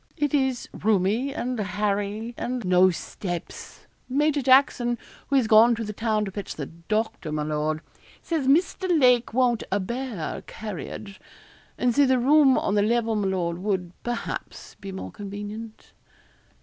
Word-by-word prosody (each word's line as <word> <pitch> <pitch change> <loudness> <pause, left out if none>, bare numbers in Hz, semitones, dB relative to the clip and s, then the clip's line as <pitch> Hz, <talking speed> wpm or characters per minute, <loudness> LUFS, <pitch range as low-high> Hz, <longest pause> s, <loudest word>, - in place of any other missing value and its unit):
It 295 -2 0
is 265 -3 +1
roomy 215 +6 +1
and 250 -3 -3
hairy, 205 +2 -2
and 245 -3 -3
no 185 +1 +5
steps. 175 0 -6 0.2
Major 295 +2 +2
Jackson, 255 -2 +4 0.3
who 280 - 0
is 260 -4 +4
gone 225 +2 +6
to 230 - -4
the 210 -1 -5
town 215 -1 0
to 195 - -5
fetch 200 0 -6
the 145 - -4
doctor, 170 +1 -3
my 150 0 -1
lord, 155 +1 -1 0.4
says 315 -6 -2
Mr. 360 +6 +2
Lake 250 -3 +4
won't 245 -1 +2
a 200 - +2
bear 235 -3 -4
carriage; 200 0 -7 0.6
and 245 -1 +2
so 285 +1 +4
the 260 0 +4
room 275 +1 +5
on - - 0
the 205 - +3
level, 225 +1 +1
my 205 -2 0
lord, 175 -3 -1
would, 185 -3 -2
perhaps, 240 -1 -5
be 195 - -6
more 190 - -6
convenient.' 210 +2 -8
220 Hz, 155 wpm, -25 LUFS, 195-255 Hz, 0.6 s, gone